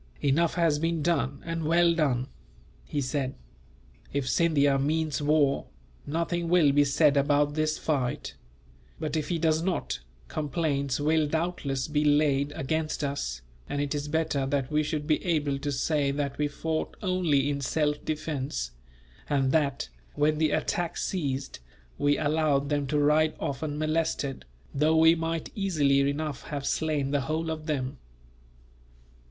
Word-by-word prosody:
"Enough 155 +5 +2
has 165 -4 +2
been 165 -1 0
done, 140 -5 0
and 165 -1 -3
well 170 +2 +4
done," 135 -7 +1 0.6
he 145 - -2
said. 135 0 -2 0.8
"If 140 -2 -1
Scindia 145 -3 +3
means 155 +1 0
war, 145 -2 +2 0.4
nothing 170 +2 -1
will 170 -5 +5
be 145 +1 +5
said 145 +1 +3
about 145 +1 +3
this 155 0 0
fight; 135 -6 -2 0.7
but 155 0 -3
if 155 -2 -2
he 175 - 0
does 160 -1 +2
not, 170 - -2 0.3
complaints 145 - -1
will 155 +1 +2
doubtless 155 -4 -1
be 150 -1 +1
laid 145 -1 +3
against 155 +3 -2
us, 60 - -3 0.3
and 145 - -2
it 145 0 -1
is 145 0 -3
better 150 -3 0
that 135 0 -1
we 150 0 +3
should 150 0 -2
be 155 0 +1
able 150 -5 0
to 145 +1 -2
say 140 +1 +1
that 140 0 -2
we 150 - +2
fought 155 +2 -3
only 175 -7 +2
in 140 -1 -1
self 150 +1 0
defence; 140 - -3 0.6
and 135 -2 +2
that, 140 -4 +1 0.3
when 150 +1 +2
the 155 -1 +3
attack 175 +3 -1
ceased, 140 - -2 0.4
we 145 0 +3
allowed 145 -2 +1
them 145 -2 0
to 150 - 0
ride 150 +2 +3
off 135 0 -3
unmolested, 155 -2 -1 0.3
though 155 +3 +3
we 160 +1 +7
might 165 -1 -3
easily 155 -9 +2
enough 150 -1 -3
have 140 -2 -4
slain 150 -3 0
the 145 -1 +1
whole 160 +4 -2
of 155 0 -6
them." 135 -3 -2
150 Hz, 150 wpm, -28 LUFS, 140-160 Hz, 0.8 s, we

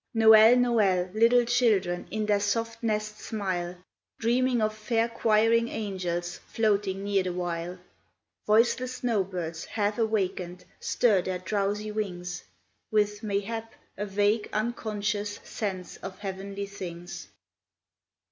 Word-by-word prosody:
Noel! 220 +1 +8
Noel! 205 -7 +2
Little 235 +2 +5
children 215 -8 +2
In 215 +1 -2
their 205 -1 +2
soft 230 +2 -1
nests 215 -1 -2
smile. 185 -5 -3 0.4
Dreaming 245 +2 +2
of 215 0 0
fair 225 +1 0
choiring 230 0 +3
angels 180 -5 -3
Floating 200 -3 0
near 200 -1 +2
the 185 -1 -3
while; 175 0 -3 0.7
Voiceless 245 +4 +3
snow 235 -5 +1
birds, 170 -3 -5
half 210 0 -1
awakened. 185 -5 -1
Stir 210 -6 +2
their 185 +1 -2
drowsy 205 +2 -2
wings 180 -4 -4 0.5
With, 210 -1 +1
mayhap, 220 +2 -3 0.2
a 205 +1 -4
vague, 205 +2 +1
unconscious 210 -2 -2
Sense 190 -4 -5
of 190 -1 -8
heavenly 200 0 -5
things. 175 -3 -8
210 Hz, 120 wpm, -28 LUFS, 190-225 Hz, 0.7 s, Noel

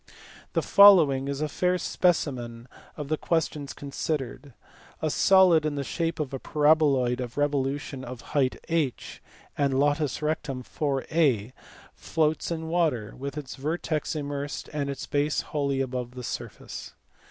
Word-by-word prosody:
The - - +1
following 160 -10 +7
is 140 +1 -3
a 155 - +1
fair 180 +4 +1
specimen 130 -10 -1 0.3
of 150 -2 -5
the 155 +1 0
questions 150 -4 -1
considered. 140 -2 -4 0.4
A 155 - -1
solid 185 -4 +5
in 155 -1 -1
the 140 - -2
shape 165 +3 -2
of 145 -3 -3
a 135 - -3
paraboloid 145 -5 +3
of 125 0 -5
revolution 140 -1 -1
of 125 -1 -8
height 135 -4 +2
h 160 -6 -2 0.3
and 140 -2 +1
latus 145 0 +1
rectum 145 -4 -2
4a 135 -5 0 0.4
floats 160 -1 -1
in 160 -1 -3
water, 155 -11 0
with 140 +3 -6
its 140 -4 -6
vertex 155 +2 -2
immersed 145 -1 -4
and 145 -2 -2
its 140 -1 -5
base 145 +1 0
wholly 140 -2 -1
above 125 -1 -4
the 125 - -7
surface. - - -7
145 Hz, 140 wpm, -27 LUFS, 135-155 Hz, 0.4 s, following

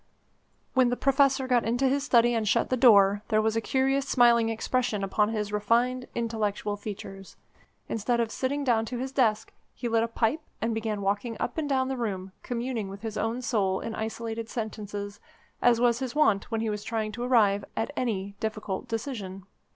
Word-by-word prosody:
When 255 -2 +4
the 245 - -1
Professor 275 -1 +3
got 245 -2 +3
into 245 +4 +1
his 275 +1 +1
study 240 -3 +4
and 225 -2 0
shut - - +1
the - - +4
door, 205 -5 +6
there 215 -2 +2
was 220 0 +1
a 225 - +1
curious 270 +3 +1
smiling 235 -3 +4
expression 225 -1 -1
upon 210 +2 +1
his 210 -2 -3
refined, 240 +5 +1
intellectual 215 -3 -1
features. 195 -2 -8 0.5
Instead 235 +2 0
of 230 -1 0
sitting 280 +2 -2
down 235 -4 +2
to 245 +2 -5
his 260 +2 -4
desk, 225 -5 +1 0.2
he 245 - -4
lit 225 -1 +2
a 230 - +1
pipe 230 +5 0 0.2
and 230 0 -1
began 220 -2 -2
walking 205 +4 -1
up - - -2
and 295 -2 -2
down 260 -1 +1
the 265 0 -3
room, 195 -5 -3
communing 235 -4 -3
with 200 +2 -10
his 220 -2 -4
own 230 +4 -2
soul 200 -5 +1
in 230 - -5
isolated 225 +1 -4
sentences, 205 -3 -5 0.4
as 240 -1 +4
was 240 -1 +3
his 260 0 -4
wont 215 -10 +2
when 225 -2 -1
he 225 - -1
was 210 0 -4
trying 220 -1 -2
to 240 - -7
arrive 215 -5 +3
at 225 +5 -1
any 200 -5 -2
difficult 215 -3 -4
decision. 210 -6 -5
225 Hz, 190 wpm, -27 LUFS, 210-245 Hz, 0.5 s, door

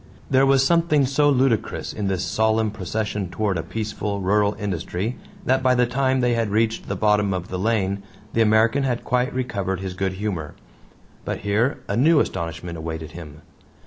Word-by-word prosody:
There 135 +1 +5
was 135 0 +4
something 165 -3 +3
so 145 +3 +3
ludicrous 130 -5 +1
in 105 -2 -3
this 95 -2 -1
solemn 110 0 +1
procession 105 -1 -3
toward 100 +1 -1
a 85 - -1
peaceful, 105 +2 -4
rural 100 +2 +2
industry 100 +2 -3 0.3
that 130 +1 +2
by 130 -1 +3
the 125 0 +4
time 130 +1 +1
they 125 -1 +2
had 115 -2 0
reached 110 +2 0
the - - -2
bottom 105 -2 +2
of 90 -1 -5
the 90 - -3
lane 100 -2 0 0.3
the 115 - +2
American 110 +5 +4
had 125 -3 -1
quite 125 +2 0
recovered 100 -8 -2
his 95 -1 -4
good 95 0 -2
humor. 95 -6 -4 0.7
But - - -4
here 105 +6 0
a 100 - -1
new 150 +6 +5
astonishment 85 - -3
awaited 80 -1 -5
him. 75 -3 -10
105 Hz, 175 wpm, -23 LUFS, 95-125 Hz, 0.7 s, There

